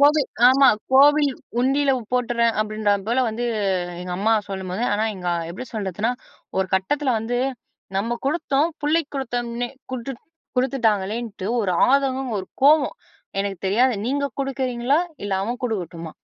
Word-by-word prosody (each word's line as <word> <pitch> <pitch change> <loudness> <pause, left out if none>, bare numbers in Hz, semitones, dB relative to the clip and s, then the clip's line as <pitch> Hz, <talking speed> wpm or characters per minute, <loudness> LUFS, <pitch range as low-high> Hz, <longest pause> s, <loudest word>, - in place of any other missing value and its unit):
"கோவில் 290 0 +5 0.2
ஆமா 270 +1 +6 0.2
கோவில் 290 +1 +6 0.3
உண்டியில 275 +2 +2 0.2
போட்டுடுறேன்" 235 -2 +2
அப்படின்ற 215 -1 0 0.2
போல 250 +3 +2
வந்து, 225 +2 -3 0.6
எங்க 180 0 -5
அம்மா 220 +3 +3 0.2
சொல்லும்போது, 190 +3 -3
ஆனா 210 +2 +1
எங்க 180 -1 -4 0.2
எப்படி 225 +9 -7
சொல்றதுன்னா, 210 +2 -1 0.5
ஒரு 190 - +1
கட்டத்தில 260 +9 +1
வந்து 235 +3 -2 0.6
நம்ம 230 +4 -1
குடுத்தோம் 290 0 +1
புள்ளைக்கு 305 +1 +1
குடுத்தோம்ன்னே, 240 -2 -3 0.2
குடுத்து 255 +2 -4 0.4
குடுத்துட்டாங்களேன்னுட்டு, 225 -4 0
ஒரு 195 -4 0 0.2
ஆதங்கம், 270 -2 +1
ஒரு 190 - -5 0.2
கோவம். 300 - +5 0.4
எனக்கு 195 -1 -2
தெரியாது 240 +6 +3
நீங்க 280 +2 0 0.2
குடுக்குறீங்களா? 265 -1 0 0.3
இல்ல 205 - -3
அவன் 240 +4 -3
குடுக்கட்டுமா? 170 -8 -4
240 Hz, 130 wpm, -23 LUFS, 205-270 Hz, 0.6 s, ஆமா